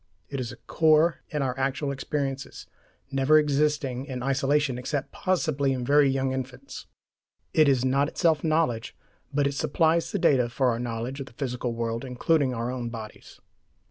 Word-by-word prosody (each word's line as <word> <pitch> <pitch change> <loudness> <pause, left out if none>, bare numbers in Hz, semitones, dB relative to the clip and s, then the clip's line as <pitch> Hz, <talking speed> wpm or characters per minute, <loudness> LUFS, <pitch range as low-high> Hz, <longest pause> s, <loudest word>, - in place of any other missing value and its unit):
It 140 - -4
is 125 -2 -4
a - - -9
core 160 +1 +3
in 150 -2 -1
our 130 -2 -1
actual 135 +2 -1
experiences, 135 0 -4 0.5
never 135 +3 +4
existing 145 -3 +1
in 125 -3 -5
isolation 135 -1 +1
except 140 +2 -3
possibly 155 -7 0
in 125 -2 -3
very 145 +1 +5
young 135 0 0
infants. 130 +1 -7 0.7
It 155 -2 +5
is 130 -2 +2
not 140 +2 +2
itself 160 -2 +1
knowledge, 155 -8 0 0.3
but 145 0 +1
it 140 - 0
supplies 160 +4 +1
the - - -1
data 130 -9 +3
for 130 +1 +1
our 115 -1 -1
knowledge 120 +3 -4
of 135 - -6
the 130 - -15
physical 125 -2 -3
world, 115 0 -2
including 135 +2 +1
our 120 0 -3
own 125 -2 -4
bodies. 110 -2 -10
135 Hz, 170 wpm, -26 LUFS, 125-150 Hz, 0.7 s, very